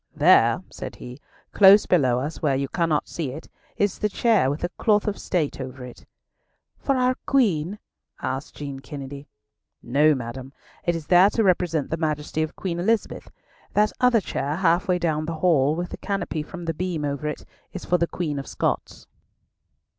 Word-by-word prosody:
"There," - - +5
said - - -7
he, 125 +4 -10 0.3
"close 200 +1 +7
below 130 -8 +3
us, 150 +4 -5
where 140 -4 +2
you 135 +1 -1
cannot 165 -1 0
see 160 -5 -4
it, 155 - -9 0.3
is 205 -2 0
the 210 - 0
chair 210 - +2
with 145 +4 -4
a 175 - 0
cloth 210 +3 +1
of 205 - -2
state 155 -6 -2
over 130 0 -7
it." 125 - -13 0.7
"For 275 - 0
our 255 0 +3
Queen?" 200 - +1 0.4
asked 135 +2 -4
Jean 140 -2 -6
Kennedy. 140 +1 -8 0.6
"No, 145 +5 +3
madam. 130 +2 -7 0.3
It 175 - +1
is 165 -2 -5
there 180 +4 +6
to 225 - 0
represent 175 -6 +1
the 160 - 0
Majesty 155 -1 -2
of 155 +1 -3
Queen 175 -3 -3
Elizabeth. 220 +5 -1 0.4
That 210 0 +3
other 250 -3 +4
chair, 145 -4 -3
half 175 0 +2
way 180 -1 +2
down 155 -3 -1
the 165 - -3
hall, 155 -4 +2
with 175 +2 -4
the - - -6
canopy 195 -5 -3
from 175 +3 -8
the 165 - -1
beam 165 -2 -3
over 140 +1 -3
it, 150 - -5 0.3
is 185 - -7
for 180 - +2
the 170 - +1
Queen 155 -6 -3
of 135 - -7
Scots." - - -3
165 Hz, 185 wpm, -24 LUFS, 145-185 Hz, 0.7 s, close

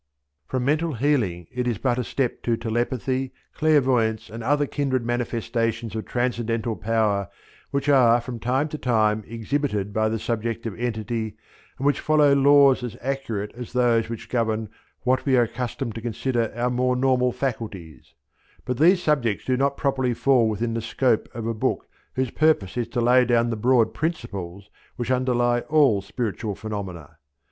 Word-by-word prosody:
From 130 -1 -2
mental 155 +3 +1
healing 115 - 0
it 125 0 -2
is 120 -4 0
but 125 +1 0
a - - 0
step 125 +1 -2
to 115 -1 0
telepathy, 125 +3 -2 0.2
clairvoyance 130 -9 +2
and 115 +1 -7
other, 145 +4 +2
kindred 130 -4 -1
manifestations 115 -1 -2
of 110 - -4
transcendental 120 -2 -1
power 105 -4 0 0.4
which, 140 +1 -2
are 125 -4 +5
from 120 0 -7
time 130 +6 0
to 155 - -6
time 110 -3 +1
exhibited 115 -3 -2
by 110 0 +1
the 110 - -1
subjective 115 -1 -3
entity 110 -2 -3 0.4
and 135 - -4
which 145 - +2
follow 150 -2 +4
laws 140 -1 +5
as 120 -4 -5
accurate 120 -6 -3
as 125 0 -9
those 120 -3 +2
which 115 -2 -6
govern 110 -3 -1 0.3
what 130 0 +2
we 135 -2 +3
are 120 - +5
accustomed 120 +1 -4
to 115 - -7
consider 120 0 -1
our 120 +1 0
more 125 +1 +1
normal 125 -1 +2
faculties; 105 - -5 0.5
but 125 0 -3
these 175 +4 +5
subjects 120 -9 +1
do 130 - +1
not 140 +2 0
properly 130 -3 0
fall 125 -3 +3
within 115 +2 -2
the 115 - -2
scope 120 0 0
of 115 -2 -4
a 115 - -1
book 110 - -2 0.3
whose 130 -2 -1
purpose 155 -12 +2
is 120 -2 -1
to 120 - -2
lay 125 +2 +5
down 120 -1 +2
the - - -1
broad 115 0 +3
principles 100 - -4 0.2
which 120 +1 -3
underlie 120 -1 +2
all 140 -10 +4
spiritual 105 0 -3
phenomena. 95 -8 -7
120 Hz, 165 wpm, -24 LUFS, 110-130 Hz, 0.5 s, are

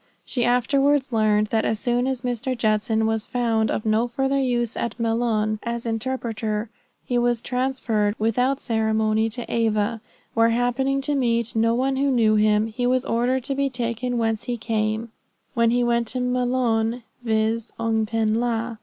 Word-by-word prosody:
She 245 - -1
afterwards 270 +3 +2
learned 215 -2 +2
that 220 -1 +2
as 220 - -1
soon 245 0 0
as 260 -2 -2
Mr. 250 +1 -2
Judson 220 0 +1
was 220 -1 -1
found 230 -3 0
of 215 - -2
no 220 +2 +2
farther 270 +3 0
use 240 -3 0
at 235 - -4
Maloun 225 -2 0
as 235 0 -4
interpreter 225 -2 -3 0.3
he 245 -1 0
was 240 -1 +1
transferred 240 -4 -1
without 250 +5 +1
ceremony 220 -2 +1
to 240 +1 -3
Ava, 225 -1 0 0.3
where 230 0 +4
happening 245 +4 +1
to 290 +2 -1
meet 235 -4 0
no 230 +1 +2
one 265 +2 0
who 280 +1 +2
knew 230 -5 +3
him, 210 0 +3
he 245 +3 -2
was 255 0 +1
ordered 245 +2 0
to 275 - -2
be 275 0 0
taken 245 0 -2
whence 225 -2 -1
he 245 -1 -2
came, 220 0 -2 0.4
when 235 -2 +3
he 245 +1 +2
went 235 -1 +1
to 255 - -2
Maloun, 245 -2 0 0.2
viz: 220 0 0
Oung 225 -1 0
pen 220 -1 0
la. 230 0 -1
235 Hz, 170 wpm, -23 LUFS, 220-250 Hz, 0.4 s, where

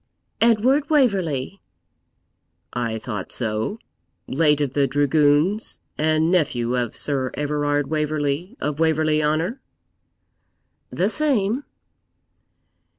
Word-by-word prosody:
'Edward 235 +5 +3
Waverley.' 195 - +1 1.1
'I 115 -2 -2
thought 105 -4 -5
so; 110 - -2 0.5
late 150 +1 +2
of 140 -3 -1
the 140 -1 +2
dragoons, 145 - +2 0.2
and 155 +2 +1
nephew 125 -9 +1
of 120 -2 -2
Sir 135 -3 -1
Everard 145 0 0
Waverley 150 - -2
of 150 +1 -3
Waverley 155 -1 +2
Honour?' 165 - -1 1.3
'The - - 0
same.' 265 -4 +1
150 Hz, 90 wpm, -22 LUFS, 140-185 Hz, 1.3 s, Edward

